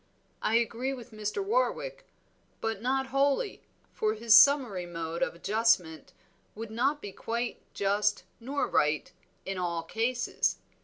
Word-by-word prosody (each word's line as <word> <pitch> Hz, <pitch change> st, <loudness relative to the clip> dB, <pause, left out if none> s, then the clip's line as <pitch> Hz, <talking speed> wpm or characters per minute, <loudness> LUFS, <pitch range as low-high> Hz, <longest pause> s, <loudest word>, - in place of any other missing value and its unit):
I 220 Hz, -, +1 dB
agree 235 Hz, +3 st, 0 dB
with 240 Hz, -3 st, -11 dB
Mr. 215 Hz, -, -3 dB
Warwick, -, -, -1 dB, 0.5 s
but 225 Hz, -2 st, -3 dB
not 265 Hz, +2 st, 0 dB
wholly, 280 Hz, +7 st, +1 dB, 0.3 s
for 215 Hz, 0 st, 0 dB
his 225 Hz, 0 st, +3 dB
summary 245 Hz, -10 st, +6 dB
mode 165 Hz, -1 st, -5 dB
of -, -, 0 dB
adjustment 190 Hz, -4 st, +1 dB, 0.4 s
would 220 Hz, 0 st, -7 dB
not 270 Hz, +6 st, 0 dB
be 205 Hz, -, -6 dB
quite 235 Hz, +4 st, -3 dB
just 205 Hz, +1 st, +1 dB, 0.2 s
nor 275 Hz, +4 st, -1 dB
right 150 Hz, 0 st, +1 dB, 0.3 s
in 195 Hz, -1 st, -3 dB
all 170 Hz, -2 st, -2 dB
cases. 235 Hz, +7 st, 0 dB
225 Hz, 135 wpm, -29 LUFS, 195-265 Hz, 0.5 s, summary